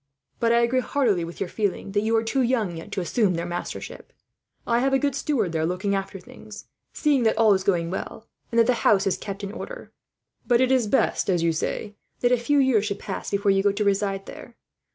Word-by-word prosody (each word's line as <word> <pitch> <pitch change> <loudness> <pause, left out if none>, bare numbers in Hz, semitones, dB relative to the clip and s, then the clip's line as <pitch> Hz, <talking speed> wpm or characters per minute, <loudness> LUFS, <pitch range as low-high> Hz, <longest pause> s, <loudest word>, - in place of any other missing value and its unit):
But 230 -1 +2
I 235 0 +4
agree 240 +2 +2
heartily 245 - +1
with 170 +1 -8
your 195 - -2
feeling 200 0 -2
that 205 +1 +1
you 225 +1 +1
are 225 - +2
too 260 +4 0
young, 230 -8 0
yet, 165 - -9
to 190 - -1
assume 185 +2 +1
their 170 +1 -3
mastership. 175 0 -6 0.5
I 235 0 +2
have 270 +2 +1
a - - +5
good 280 0 0
steward 255 - -1
there 160 -1 -1
looking 180 +4 -1
after 195 0 -3
things, 210 +3 -12 0.3
seeing 290 -4 +1
that 220 -1 +2
all 220 -3 +5
goes 190 0 -4 0.2
well, 190 +5 -6 0.2
and 235 - -2
that 230 - +6
the 250 - +3
house 200 -1 +4
is 195 - +1
kept 200 0 -7
in 200 - -4
order. - - -8 0.6
But 240 -1 +4
it 260 0 +3
is 255 -4 +3
best, 265 - +1
as 175 -3 +2
you 170 - +3
say, 205 +6 -3 0.3
that 245 - +3
a 250 - +4
few 265 +5 +1
years 260 -6 +3
should 200 -1 -2
pass - - -5
before 200 0 +1
you 195 0 +3
go 200 0 +3
to 205 +2 -2
reside 195 -1 0
there. 240 - -11
210 Hz, 235 wpm, -24 LUFS, 195-240 Hz, 0.6 s, that